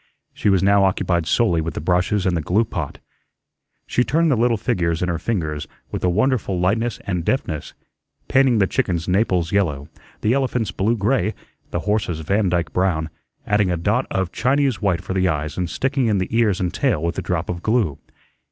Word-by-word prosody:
She - - 0
was 95 -1 +3
now 100 0 +4
occupied 90 -3 +1
solely 85 -2 +2
with 85 +1 -4
the - - -2
brushes 90 +4 +1
and 90 -2 +2
the 85 - 0
glue 100 +9 +2
pot. 85 -9 -5 0.9
She 125 - +1
turned 160 +4 +2
the - - +4
little 115 0 +2
figures 85 -4 0
in 90 - 0
her 85 -2 -1
fingers 80 -8 -2 0.2
with - - -4
a 90 - +3
wonderful 105 -1 +1
lightness 110 +6 0
and 90 -3 -2
deftness, 80 - -2 0.5
painting 130 -3 +4
the 100 - +4
chickens 85 -3 -1
Naples 90 -3 +1
yellow, 75 -8 0 0.3
the 110 - +2
elephants 125 -7 0
blue 110 +6 0
gray, 110 0 +1 0.3
the - - -2
horses 105 -6 -1
Vandyke 90 -3 0
brown, 80 -4 0 0.3
adding 105 -2 +2
a 90 - 0
dot 105 +9 0
of 95 -2 -1
Chinese 135 0 +1
white 95 -5 +1
for - - -4
the 95 0 +2
eyes 75 -2 -2
and 90 -2 -2
sticking 135 +2 0
in 105 -2 +2
the 95 +4 -2
ears 110 -5 +2
and 90 -1 -1
tail 75 - 0
with 85 0 -1
a - - -2
drop 90 -1 -2
of 85 -1 -4
glue. 105 - +1
95 Hz, 195 wpm, -21 LUFS, 85-110 Hz, 0.9 s, now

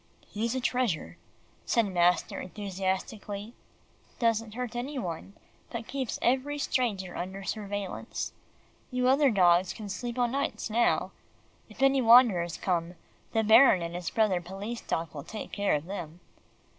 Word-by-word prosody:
"He's 230 +4 -2
a - - 0
treasure," 245 -8 -1 0.4
said 230 -2 +2
master 180 -2 +2
enthusiastically; 200 +2 -4 0.6
"doesn't 225 -2 0
hurt 250 -1 -4
any 265 +4 -4
one 185 -2 -5 0.3
but 230 -1 -5
keeps 265 -4 -3
every 265 +4 +1
stranger 210 -10 -1
under 190 +2 -5
surveillance. 205 -1 -4 0.6
You 250 -1 0
other 275 +2 +5
dogs 180 -4 +4
can 210 -2 -8
sleep 240 +5 -4
o' 245 - +3
nights 240 -3 -2
now. 235 +2 +2 0.6
If - - -4
any 270 0 +5
wanderers 225 -9 +6
come, 175 -1 -1 0.4
the 225 -1 +2
Baron 220 -4 +7
and 170 0 -5
his 175 -1 -3
brother 210 -5 +2
policeman 195 +6 -7
dog 165 -1 -2
will 145 -2 -6
take 215 - -7
care 200 -4 +1
of 150 +1 -3
them." 175 -3 -6
210 Hz, 145 wpm, -29 LUFS, 185-240 Hz, 0.6 s, Baron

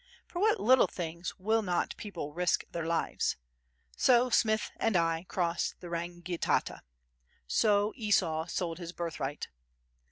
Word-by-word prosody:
For 350 - -6
what 430 +2 +3
little 255 +5 +5
things 170 0 -5
will 220 +4 +1
not 180 -4 -1
people 170 -8 -6
risk 180 +1 +1
their 165 -1 -3
lives? 165 0 0 0.6
So 250 0 +4
Smith 220 -2 +2
and 225 -4 +2
I 165 0 +1
crossed 170 -2 -1
the 175 - -9
Rangitata. 175 +1 -2 0.6
So 205 - +2
Esau 175 -8 +1
sold 170 -1 -3
his 170 -1 -7
birthright. 155 -5 -4
175 Hz, 130 wpm, -31 LUFS, 170-215 Hz, 0.6 s, little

